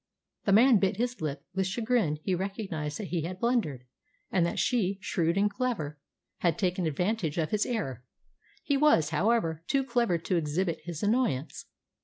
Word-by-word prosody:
The 200 Hz, -, +2 dB
man 235 Hz, +4 st, +7 dB
bit 190 Hz, -1 st, +1 dB
his 245 Hz, -1 st, -2 dB
lip. 150 Hz, -2 st, -3 dB
With 190 Hz, 0 st, 0 dB
chagrin 220 Hz, -6 st, +1 dB
he 190 Hz, -, 0 dB
recognised 185 Hz, -5 st, -3 dB
that 210 Hz, -, -6 dB
he 175 Hz, -2 st, -1 dB
had 180 Hz, +4 st, -5 dB
blundered, 220 Hz, -, 0 dB, 0.5 s
and 180 Hz, -, +3 dB
that -, -, -4 dB
she, 200 Hz, -6 st, +1 dB
shrewd 170 Hz, -3 st, 0 dB
and 205 Hz, +1 st, +4 dB
clever, 205 Hz, -, -3 dB, 0.4 s
had 170 Hz, -3 st, +1 dB
taken 180 Hz, -2 st, 0 dB
advantage 180 Hz, +1 st, -1 dB
of 160 Hz, -2 st, 0 dB
his 210 Hz, -1 st, +1 dB
error. 135 Hz, -, -3 dB, 0.6 s
He 280 Hz, -, +1 dB
was, 220 Hz, -, +4 dB
however, 165 Hz, -2 st, +1 dB
too 275 Hz, 0 st, +2 dB
clever 235 Hz, -8 st, +1 dB
to 170 Hz, +2 st, -1 dB
exhibit 165 Hz, +2 st, -1 dB
his 170 Hz, 0 st, -5 dB
annoyance. 205 Hz, -, 0 dB
190 Hz, 170 wpm, -29 LUFS, 160-225 Hz, 0.6 s, man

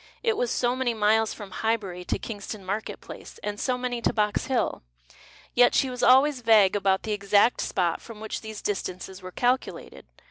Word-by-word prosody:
It 455 Hz, -2 st, +2 dB
was 485 Hz, +2 st, 0 dB
so 245 Hz, 0 st, +1 dB
many 255 Hz, -3 st, -1 dB
miles 220 Hz, +1 st, +3 dB
from 205 Hz, -3 st, -9 dB
Highbury 200 Hz, -4 st, -2 dB
to -, -, -1 dB
Kingston 205 Hz, -2 st, -7 dB
market 205 Hz, +4 st, -4 dB
place, -, -, -11 dB
and 205 Hz, 0 st, -4 dB
so 255 Hz, -1 st, 0 dB
many 245 Hz, -1 st, -3 dB
to -, -, +2 dB
Box 210 Hz, -1 st, 0 dB
Hill. 260 Hz, -3 st, 0 dB, 0.7 s
Yet 245 Hz, 0 st, +5 dB
she 265 Hz, -, +2 dB
was 250 Hz, -, -5 dB
always 265 Hz, +1 st, +5 dB
vague 215 Hz, -4 st, +5 dB
about 195 Hz, -1 st, +1 dB
the 220 Hz, -, -3 dB
exact 205 Hz, +3 st, +3 dB
spot 175 Hz, -3 st, -1 dB
from 225 Hz, -3 st, -11 dB
which 220 Hz, 0 st, -5 dB
these 220 Hz, -1 st, -8 dB
distances 190 Hz, -1 st, -4 dB
were 185 Hz, 0 st, -8 dB
calculated. 250 Hz, +6 st, -2 dB
220 Hz, 185 wpm, -26 LUFS, 200-245 Hz, 0.7 s, Yet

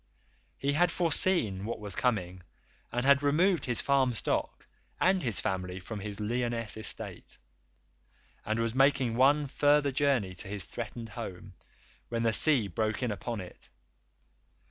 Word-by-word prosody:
He 140 Hz, +1 st, 0 dB
had 175 Hz, +4 st, +3 dB
foreseen 165 Hz, -, +1 dB
what 110 Hz, +1 st, -4 dB
was 105 Hz, -3 st, -6 dB
coming 95 Hz, -7 st, -1 dB, 0.5 s
and 120 Hz, +2 st, -1 dB
had 140 Hz, 0 st, +6 dB
removed 160 Hz, +3 st, +2 dB
his 120 Hz, -2 st, +1 dB
farm 135 Hz, -3 st, +2 dB
stock -, -, -1 dB, 0.3 s
and 185 Hz, 0 st, +3 dB
his 115 Hz, -7 st, 0 dB
family 90 Hz, -1 st, -2 dB
from 105 Hz, +3 st, -7 dB
his 100 Hz, 0 st, -6 dB
Lyonesse 115 Hz, 0 st, -2 dB
estate, 110 Hz, -, -6 dB, 1.1 s
and 110 Hz, +2 st, -1 dB
was 115 Hz, -1 st, 0 dB
making 135 Hz, -3 st, +3 dB
one 145 Hz, +4 st, +4 dB
further 145 Hz, +1 st, +3 dB
journey 130 Hz, -8 st, +1 dB
to 95 Hz, +2 st, -7 dB
his 100 Hz, 0 st, -5 dB
threatened 115 Hz, 0 st, -6 dB
home 95 Hz, -4 st, -8 dB, 0.6 s
when 115 Hz, -1 st, -1 dB
the 115 Hz, -1 st, +2 dB
sea 130 Hz, -3 st, +3 dB
broke 110 Hz, +4 st, -2 dB
in 120 Hz, -, 0 dB
upon 110 Hz, +1 st, -4 dB
it. 90 Hz, -, -12 dB
115 Hz, 145 wpm, -30 LUFS, 105-140 Hz, 1.1 s, had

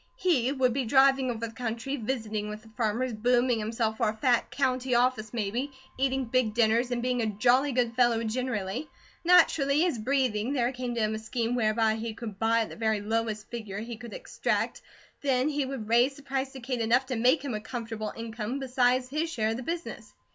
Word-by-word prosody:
He 305 Hz, -, +2 dB
would 260 Hz, -3 st, +2 dB
be 270 Hz, +1 st, 0 dB
driving 265 Hz, +1 st, +4 dB
over 230 Hz, -1 st, -2 dB
the 225 Hz, -, -8 dB
country, 235 Hz, +3 st, -3 dB
visiting 220 Hz, -4 st, -3 dB
with 210 Hz, 0 st, -7 dB
the 225 Hz, -, -16 dB
farmers, 230 Hz, +2 st, -1 dB
booming 245 Hz, +2 st, +2 dB
himself 220 Hz, 0 st, -1 dB
for 225 Hz, -2 st, +2 dB
a 215 Hz, -, -5 dB
fat 245 Hz, -1 st, +2 dB
county 260 Hz, -2 st, 0 dB
office 240 Hz, -3 st, +1 dB
maybe, 235 Hz, +5 st, -2 dB, 0.2 s
eating 265 Hz, 0 st, 0 dB
big 230 Hz, -2 st, +1 dB
dinners, 235 Hz, +1 st, +3 dB
and 240 Hz, -1 st, -2 dB
being 250 Hz, -1 st, 0 dB
a 220 Hz, -, 0 dB
jolly 245 Hz, +7 st, +3 dB
good 240 Hz, -2 st, +1 dB
fellow 240 Hz, -2 st, +3 dB
generally. 230 Hz, +1 st, -2 dB, 0.3 s
Naturally 315 Hz, -3 st, +5 dB
as 310 Hz, -10 st, -1 dB
breathing, 255 Hz, -1 st, 0 dB
there 245 Hz, -3 st, +1 dB
came 250 Hz, -2 st, -4 dB
to 230 Hz, -, 0 dB
him 215 Hz, 0 st, +1 dB
a 215 Hz, -, -3 dB
scheme 230 Hz, +1 st, -2 dB
whereby 220 Hz, -2 st, +2 dB
he 225 Hz, 0 st, -4 dB
could 215 Hz, -4 st, -7 dB
buy 230 Hz, +1 st, +3 dB
at 220 Hz, -, -3 dB
the -, -, -9 dB
very 220 Hz, -1 st, 0 dB
lowest 220 Hz, 0 st, -2 dB
figure 215 Hz, -5 st, -5 dB
he 230 Hz, +2 st, -6 dB
could 235 Hz, -2 st, -9 dB
extract; -, -, -2 dB, 0.4 s
then 270 Hz, 0 st, +2 dB
he 290 Hz, -2 st, -1 dB
would 260 Hz, -6 st, -5 dB
raise 240 Hz, +4 st, +3 dB
the 285 Hz, -, -14 dB
price 270 Hz, -1 st, -2 dB
to 265 Hz, -, -9 dB
Kate 250 Hz, -1 st, -2 dB
enough 240 Hz, +4 st, +3 dB
to 255 Hz, -1 st, -3 dB
make 255 Hz, +6 st, +3 dB
him 265 Hz, -, -2 dB
a 210 Hz, -, -3 dB
comfortable 225 Hz, -2 st, -5 dB
income 230 Hz, +2 st, -4 dB
besides 255 Hz, -1 st, +1 dB
his 305 Hz, +5 st, -2 dB
share 220 Hz, -7 st, 0 dB
of 225 Hz, -, -2 dB
the -, -, -5 dB
business. 335 Hz, +6 st, -6 dB
240 Hz, 210 wpm, -28 LUFS, 220-260 Hz, 0.4 s, Naturally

